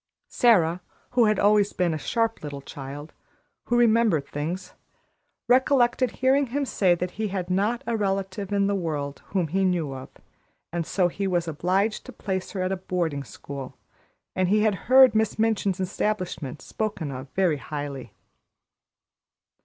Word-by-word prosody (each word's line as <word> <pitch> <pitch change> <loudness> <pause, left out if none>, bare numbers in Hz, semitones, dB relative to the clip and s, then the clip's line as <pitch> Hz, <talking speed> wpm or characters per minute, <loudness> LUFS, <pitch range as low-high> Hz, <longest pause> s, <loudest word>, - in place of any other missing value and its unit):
Sara, 180 -8 +3 0.3
who 245 -2 +4
had 215 -1 +2
always 205 0 +3
been 175 -3 +1
a - - -2
sharp 225 +8 -1
little 140 -2 -6
child, 140 +2 -8 0.5
who 240 - +1
remembered 225 -10 +3
things, 165 +7 -5 0.7
recollected 255 -1 +3
hearing 270 +2 +2
him 280 +4 -1
say 185 -8 +2
that 180 +1 -3
he 215 - +1
had 185 -2 -3
not 210 +6 0
a 235 - -1
relative 195 -1 -2
in 200 -1 +2
the 200 - +1
world 150 -6 -3
whom 180 -5 -1
he 190 +4 +1
knew 175 -7 0
of, 130 0 -8 0.6
and 170 -1 -3
so 185 -3 +2
he 195 +3 -3
was 175 -2 0
obliged 185 +7 0
to - - -7
place 190 -2 -4
her 190 -2 -2
at 185 - -1
a 195 - -1
boarding 170 -6 -2
school, 135 0 -9 0.6
and 185 -1 +1
he 210 +2 +3
had 215 -1 +3 0.2
heard 260 -3 +8
Miss 220 -1 +1
Minchin's 215 -4 +1
establishment 185 -7 -3
spoken 195 -9 -3
of 130 +1 -7
very 180 -6 +2
highly. 140 -3 -6
185 Hz, 160 wpm, -25 LUFS, 160-215 Hz, 0.7 s, heard